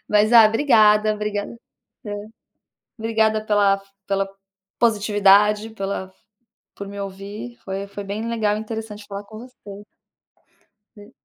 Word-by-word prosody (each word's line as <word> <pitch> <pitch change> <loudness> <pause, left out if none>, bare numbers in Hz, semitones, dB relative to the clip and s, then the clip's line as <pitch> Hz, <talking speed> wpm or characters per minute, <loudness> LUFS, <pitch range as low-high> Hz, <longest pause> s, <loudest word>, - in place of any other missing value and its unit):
Mas, 210 +2 +3
ah, 225 -2 +9
obrigada, 215 -3 +4
obriga 210 -1 -3 0.6
Hã. 205 - -4 0.9
Obrigada 220 -1 +1
pela 205 -2 +3
f 195 - -18 0.2
pela 195 0 0 0.5
positividade, 210 -1 +3
pela 195 -2 -4
f 190 - -32 0.5
por 200 - -7
me 200 0 -9
ouvir, 200 +5 -8
foi 195 +1 -4
foi 200 0 -8
bem 210 +3 -4
legal 215 -3 0
e - - -4
interessante 220 -2 -7
falar 200 0 -6
com 215 +1 -11
você. 205 -5 -12 1.1
E 205 +3 -14
210 Hz, 135 wpm, -22 LUFS, 200-220 Hz, 1.1 s, ah